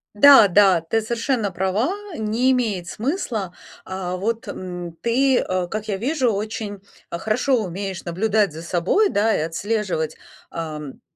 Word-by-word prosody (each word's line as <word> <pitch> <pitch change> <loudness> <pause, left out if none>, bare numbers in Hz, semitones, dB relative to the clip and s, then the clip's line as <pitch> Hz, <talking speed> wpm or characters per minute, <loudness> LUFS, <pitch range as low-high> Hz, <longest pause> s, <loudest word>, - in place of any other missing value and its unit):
Да, 270 -1 +9
да, 190 -2 +5
ты 170 +8 0
совершенно 230 -1 -1
права, 190 - 0 0.3
не 225 +4 +1
имеет 215 -9 0
смысла. 225 - -3 0.3
А, 185 -1 -4
вот, 225 +5 -2
м, 180 -3 -6
ты, 260 +3 +3
э, 185 -1 -1
как 215 +4 -5
я 200 -3 -1
вижу, 255 +2 +1
очень 210 0 -4 0.3
хорошо 220 +7 0
умеешь 190 0 -5
наблюдать 200 +2 +1
за 160 - -7
собой, 180 - +2
да, 220 - +2
и - - -1
отслеживать, 170 -1 -2 0.3
ам, 155 -4 -6
205 Hz, 140 wpm, -22 LUFS, 180-230 Hz, 0.3 s, Да